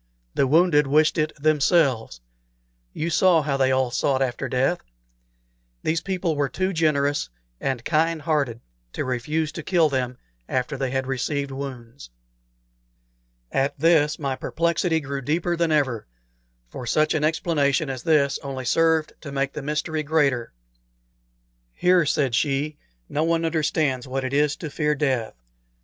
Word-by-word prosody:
The 135 - +2
wounded 150 -1 +4
wished 155 +3 +3
it 155 0 +1
themselves. 145 - +2 0.7
You 165 - -3
saw 170 -1 +4
how 140 -1 -1
they 135 -1 +2
all 130 -1 +1
sought 130 +2 +1
after 125 -2 -3
death. 135 +7 +1 1.0
These 160 +1 0
people 180 -3 -1
were 145 -1 0
too 185 +8 -1
generous 145 - +1 0.3
and 130 -4 -2
kind 160 0 +1
hearted 140 -7 0 0.3
to - - -3
refuse 145 +5 -1
to 165 - -6
kill 165 -1 +2
them 125 -2 -2 0.3
after 130 +2 -1
they 135 -1 -2
had 130 +1 -1
received 140 +1 -2
wounds." 125 - -8 1.4
At 135 +1 0
this 150 -1 +3
my 135 -3 -2
perplexity 170 +2 0
grew 140 -1 -4
deeper 165 +6 0
than 170 -1 0
ever, 130 -8 0 0.6
for 120 - -8
such 155 +5 +2
an 155 -2 0
explanation 155 -2 +1
as 130 -2 -4
this 145 -4 +2
only 135 -2 -5
served 160 +3 +2
to 140 - -8
make 140 0 -1
the 150 - -5
mystery 150 +2 -2
greater. 140 -5 +1 1.2
"Here," 180 -3 +3
said 135 -4 +1
she, 145 +3 0 0.3
"no 150 - -1
one 165 0 +1
understands 150 -5 0
what 135 +1 -3
it 130 +1 -3
is 145 0 +2
to 160 -4 -7
fear 150 0 0
death. 130 -6 -1
145 Hz, 150 wpm, -24 LUFS, 135-160 Hz, 1.4 s, wounded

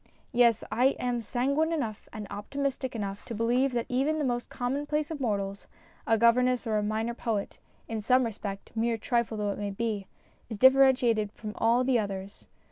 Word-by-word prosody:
Yes, 235 -2 +4
I 250 +5 +3
am 245 -1 -1
sanguine 275 +8 0
enough 230 -10 -3
and 215 -1 -6
optimistic 260 +4 -3
enough 200 -2 -4
to 230 - -6
believe 245 +5 +2
that 235 -1 0
even 275 +5 +1
the 300 - 0
most 240 -1 -2
commonplace 290 +4 -2
of 310 - -4
mortals 200 -4 -2 0.4
a 225 - +4
governess 250 +2 +3
or 215 -2 +1
a - - 0
minor 220 +3 -1
poet 225 -4 -3 0.3
in 225 -1 -3
some 255 +4 +4
respect, 205 -3 -5
mere 230 0 0
trifle 235 0 -1
though 205 -1 -1
it - - -6
may 205 -1 -2
be, 205 -1 -3 0.4
is 220 - -5
differ 260 +4 +7
entiated 240 -6 +3
from 210 -1 -7 0.3
the 255 -2 +3
others. 195 -1 -5
235 Hz, 180 wpm, -28 LUFS, 210-255 Hz, 0.4 s, differ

